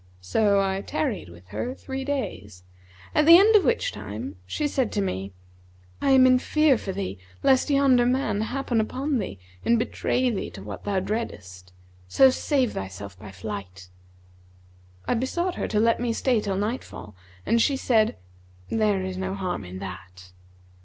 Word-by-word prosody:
So 200 - +2
I 195 0 0
tarried 250 - -3
with 85 +2 -16
her 250 +2 -4
three 270 0 -5
days, 105 - -4 0.5
at 300 0 +3
the 335 +1 +11
end 425 +4 +5
of 410 - +6
which 485 +1 +1
time 100 -2 -7
she 300 - -1
said 260 -5 -1
to 205 - 0
me, 95 - -3 0.7
'I - - +1
am 265 -1 +7
in 255 0 +5
fear 305 0 +3
for 195 - -4
thee, 190 - -4 0.2
lest 265 +2 +3
yonder 270 -4 +4
man 250 -5 0
happen 245 0 -1
upon 265 +4 -1
thee 185 - -5 0.3
and 235 - +3
betray 250 +2 0
thee 205 - -3
to 95 - -10
what 100 0 -8
thou 200 -2 +1
dreadest; 95 - -5 0.4
so 265 - +6
save 260 -2 0
thyself 95 0 -7
by 105 0 -10
flight.' 95 -2 -7 1.2
I - - +2
besought 345 +10 -1
her - - -3
to 210 - 0
let 230 +1 +3
me 240 -1 0
stay 240 -1 +1
till 195 -2 -2
nightfall, 205 - -4 0.3
and 230 - +3
she 275 +3 +2
said, 225 - +2 0.5
'There 210 -4 +1
is 185 0 -4
no 190 +1 -3
harm 185 - -3
in 90 +1 -8
that.' 90 -1 -9
215 Hz, 170 wpm, -25 LUFS, -, 1.2 s, the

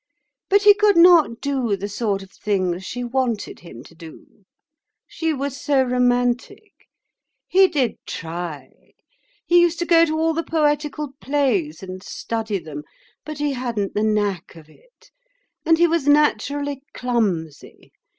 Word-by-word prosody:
But 405 +1 +4
he 410 0 +8
could 415 -2 +3
not 335 -9 +5
do 265 -7 -1
the 200 +2 -5
sort 205 -2 -2
of 195 - -16
things 185 -4 -2
she 245 +5 -5
wanted 245 -3 -2
him 130 -8 -12
to 165 - -17
do; 165 +4 -15 0.6
she 325 -1 -3
was 280 -1 -4
so 275 -2 +2
romantic. 245 - -1 0.7
He 380 +1 +5
did 275 - -1
try. 165 -4 -6 0.7
He 350 0 +5
used 345 -1 +2
to 345 - -2
go 335 -1 +5
to 315 -1 -2
all 325 0 +1
the 330 - -1
poetical 300 -2 -1
plays 215 - -1
and 185 0 -8
study 220 +1 -4
them. 155 -4 -8 0.4
But 305 -1 -7
he 290 -1 -1
hadn't 235 -6 -3
the 210 - -1
knack 205 -6 -1
of 160 -2 -15
it - - -25 0.6
and 325 0 +5
he 345 - +4
was 330 -4 0
naturally 285 0 +1
clumsy. 200 - -3
250 Hz, 150 wpm, -21 LUFS, 195-305 Hz, 0.7 s, he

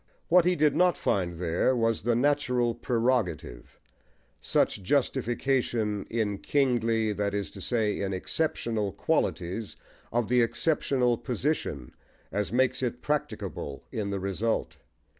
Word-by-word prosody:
What 175 0 +6
he 180 0 +3
did 150 -2 +3
not 180 -2 +3
find 90 -3 0
there 90 +9 +1
was 115 -2 +1
the 120 +2 +1
natural 125 -3 +2
prerogative 115 - -1 0.6
such 100 - +1
justification, 120 -3 0
in 105 -3 -1
kingly, 115 -6 +1
that 100 0 -1
is 100 -1 -3
to - - -10
say, 110 -4 0
in 100 -1 -1
exceptional, 110 -1 -1
qualities, 95 +5 -1 0.4
of 120 -1 0
the 125 +1 +4
exceptional 125 0 +1
position, 125 - -2 0.4
as 105 0 -1
makes 130 +2 +2
it 125 -1 -3
practicable 150 0 -3
in 105 -2 -2
the 100 -1 -2
result. 100 +4 -1
115 Hz, 125 wpm, -28 LUFS, 100-130 Hz, 0.6 s, What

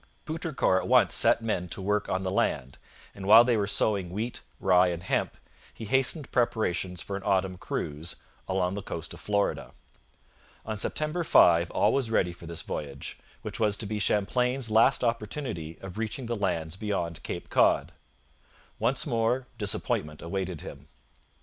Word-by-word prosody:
Poutrincourt 155 - 0
at - - -6
once - - +4
set - - +3
men 90 -6 -2
to 80 - -4
work 105 +2 0
on 95 0 -1
the 95 - -2
land, 70 -8 -1 0.3
and 95 -1 -7
while 110 +3 +9
they 120 -1 +2
were 100 -2 0
sowing 100 -3 +1
wheat, 110 +6 -3 0.2
rye, 90 -1 +4
and 85 0 -3
hemp - - -1 0.3
he 110 - -9
hastened 135 +5 +1
preparations 90 -7 0
for 100 - -5
an 100 - -4
autumn 95 -2 +1
cruise 80 -2 -4 0.3
'along 95 -1 0
the 100 - -4
coast 85 -4 -5
of - - -11
Florida.' 100 -1 -1 0.9
On 110 - -3
September 155 +10 -1
5 85 - +5
all 105 +2 +2
was 135 -4 0
ready 95 -5 +2
for 85 -1 -12
this 85 -2 -3
voyage, 70 -2 -6 0.2
which - - -5
was 105 -2 +2
to - - -4
be 105 +1 -3
Champlain's 125 +5 +1
last 115 +5 +4
opportunity 110 - -3
of 95 +2 -7
reaching 115 +3 -3
the 120 0 -2
lands 90 -5 -2
beyond 95 -6 -3
Cape - - -6
Cod. - - +3 0.9
Once - - +2
more 120 +3 0
disappointment 75 -7 -2
awaited 90 -1 -3
him. 70 +1 -10
100 Hz, 165 wpm, -28 LUFS, 90-115 Hz, 0.9 s, while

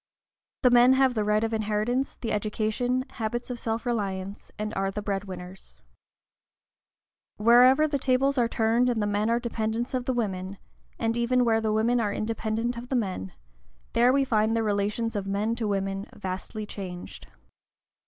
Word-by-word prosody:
The 250 - +6
men 245 +1 +7
have 265 -1 +3
the 215 -3 0
right 210 +1 +2
of 225 0 -1
inheritance, 220 +4 -1
the 230 - -4
education, 220 +5 -1
habits 240 +1 -4
of 240 - -5
self 225 +1 -3
reliance, 200 -4 -3
and 215 +1 -3
are 195 -1 0
the 210 +2 -5
bread 200 -1 -2
winners. 185 0 -10 1.5
Wherever 250 +7 +6
the 290 -2 -1
tables 270 +1 +2
are 235 - +3
turned, 230 +2 +2
and 235 -2 0
the 205 - +1
men 205 +1 0
are 235 +1 +2
dependents 230 +1 -2
of 250 -1 -1
the 260 - 0
women, 195 -4 -3 0.4
and 225 0 0
even 245 +1 +2
where 225 -1 +3
the 220 -1 0
women 230 +3 +2
are 210 -3 0
independent 225 +2 -2
of 240 +1 -8
the 265 - 0
men, 185 - -2 0.6
there 240 +2 +5
we 275 +1 +3
find 220 -2 +2
the 225 - +1
relations 210 +2 -1
of 200 -1 -2
men 205 +3 0
to 225 -3 -1
women 195 0 -2
vastly 190 +3 -5
changed. 185 -4 -8
225 Hz, 175 wpm, -27 LUFS, 205-240 Hz, 1.5 s, men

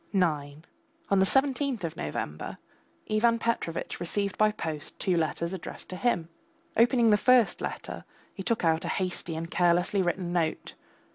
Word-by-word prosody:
IX 150 -6 0 0.5
On 195 - +5
the 190 - +5
seventeenth 270 -3 +2
of 165 -2 -3
November 75 0 -4 0.5
Ivan 230 +2 +3
Petrovitch 230 -8 -2
received 200 +3 -1
by 215 0 +4
post 155 -7 -6
two 185 - +1
letters 170 +2 -1
addressed 190 - -8
to 185 - -5
him. 180 -6 0 0.5
Opening 235 -1 +5
the 210 - +6
first 250 0 +4
letter, - - -5 0.3
he 195 - -7
took 225 -2 0
out 160 0 +2
a - - -3
hasty 180 -3 -2
and 165 +1 -5
carelessly 175 +3 +3
written 175 0 -1
note. 165 -3 -1
185 Hz, 155 wpm, -28 LUFS, 165-220 Hz, 0.5 s, the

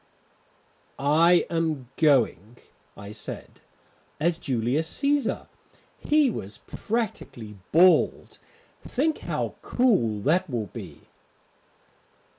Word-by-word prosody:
"I 165 +5 +4
am 155 -7 -2
going," 120 - +2 0.4
I 100 +1 -9
said, - - -8 0.6
"as 165 +2 +1
Julius 130 +6 -1
Cæsar. 285 0 0 0.5
He 295 -3 +2
was 100 - -7
practically 125 - -4
bald. 180 +3 +3 0.4
Think 305 +4 -1
how - - -3
cool 190 - +1
that 170 - +1
will 110 -7 -3
be." - - -9
155 Hz, 85 wpm, -25 LUFS, 115-185 Hz, 0.6 s, I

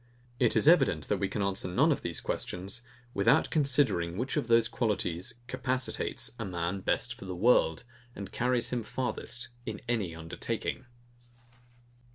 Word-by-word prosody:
It - - +3
is - - +4
evident, - - +4
that - - +1
we 100 - 0
can 105 - -2
answer 100 -1 0
none 140 - +3
of 145 - 0
these 85 -2 -2
questions, 95 +6 -4 0.3
without 100 - +3
considering 130 - +2
which 130 +4 -2
of - - 0
those 115 -1 +5
qualities 95 -7 -1
capacitates 130 +1 -1
a - - -2
man 90 -1 -2
best 120 +5 0
for 120 -4 -11
the 90 -1 -5
world, 90 -5 +3 0.3
and 100 -1 -7
carries 125 0 +2
him 125 -1 0
farthest 120 +1 -3
in 110 -4 -5
any 105 -9 -1
undertaking. 110 +10 -4
110 Hz, 155 wpm, -30 LUFS, 90-125 Hz, 0.3 s, those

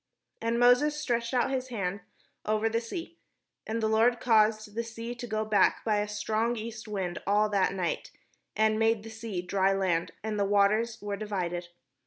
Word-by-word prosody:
And 230 +1 0
Moses 250 +5 +4
stretched 235 -4 -1
out 255 0 +1
his 260 -1 -2
hand 200 -5 -3 0.4
over 215 +1 +1
the 230 +1 0
sea; 335 +7 -7 0.5
and 225 +1 -2
the - - +3
Lord 225 +2 +3
caused 215 -2 +3
the 230 +2 -2
sea 230 +1 -6
to 245 0 -7
go 215 -1 -1
back 210 -3 +2
by 215 -2 +2
a 205 - -1
strong 215 +3 -1
east 220 0 -7
wind 190 -4 -3
all 210 +1 +3
that 195 -1 +1
night, 180 -3 -2 0.5
and 215 0 +2
made 225 -1 +2
the 225 - -9
sea 220 -5 -5
dry 195 +1 +2
land, 185 -4 0
and 215 -1 -2
the - - +3
waters 210 +3 +2
were 205 -1 -3
di\dded. 180 -4 -3
215 Hz, 185 wpm, -29 LUFS, 205-230 Hz, 0.5 s, Moses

